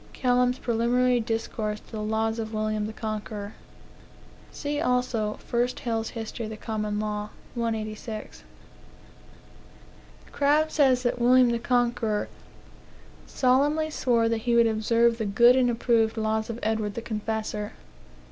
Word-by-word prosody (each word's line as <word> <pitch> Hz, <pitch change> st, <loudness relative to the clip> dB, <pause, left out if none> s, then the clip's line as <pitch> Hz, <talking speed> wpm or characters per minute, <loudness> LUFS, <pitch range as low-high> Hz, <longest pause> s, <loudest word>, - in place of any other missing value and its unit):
Kelham's 250 Hz, 0 st, +2 dB
Preliminary 245 Hz, +1 st, +2 dB
Discourse 225 Hz, -2 st, -3 dB
to -, -, -22 dB
the 215 Hz, -2 st, -4 dB
Laws 220 Hz, +1 st, -1 dB
of 220 Hz, 0 st, -4 dB
William 215 Hz, 0 st, -1 dB
the -, -, -5 dB
Conqueror. 215 Hz, -1 st, -5 dB, 1.0 s
See, 290 Hz, 0 st, -3 dB
also, 250 Hz, -4 st, 0 dB
1 240 Hz, +1 st, +2 dB, 0.2 s
Hale's 225 Hz, -2 st, -1 dB
History 225 Hz, 0 st, -5 dB
of -, -, -6 dB
the 220 Hz, -, -7 dB
Common 210 Hz, -1 st, -3 dB
Law, 210 Hz, 0 st, -3 dB, 0.2 s
186. 220 Hz, -1 st, -4 dB, 1.9 s
Crabbe 300 Hz, +2 st, +2 dB
says 265 Hz, -4 st, +3 dB
that 245 Hz, 0 st, 0 dB
William 250 Hz, 0 st, +5 dB
the 235 Hz, -, 0 dB
Conqueror 240 Hz, -3 st, 0 dB, 1.0 s
"solemnly 290 Hz, +5 st, +2 dB
swore 235 Hz, -5 st, +2 dB
that 230 Hz, 0 st, +1 dB
he 235 Hz, +1 st, 0 dB
would 235 Hz, 0 st, +6 dB
observe 230 Hz, +1 st, +2 dB
the 220 Hz, -, -1 dB
good 235 Hz, +5 st, +5 dB
and 255 Hz, -2 st, +3 dB
approved 230 Hz, -1 st, +1 dB
laws 220 Hz, 0 st, -1 dB
of 230 Hz, -, -4 dB
Edward 215 Hz, -2 st, -1 dB
the 235 Hz, -, -5 dB
Confessor." 215 Hz, -1 st, -3 dB
230 Hz, 135 wpm, -26 LUFS, 215-245 Hz, 1.9 s, would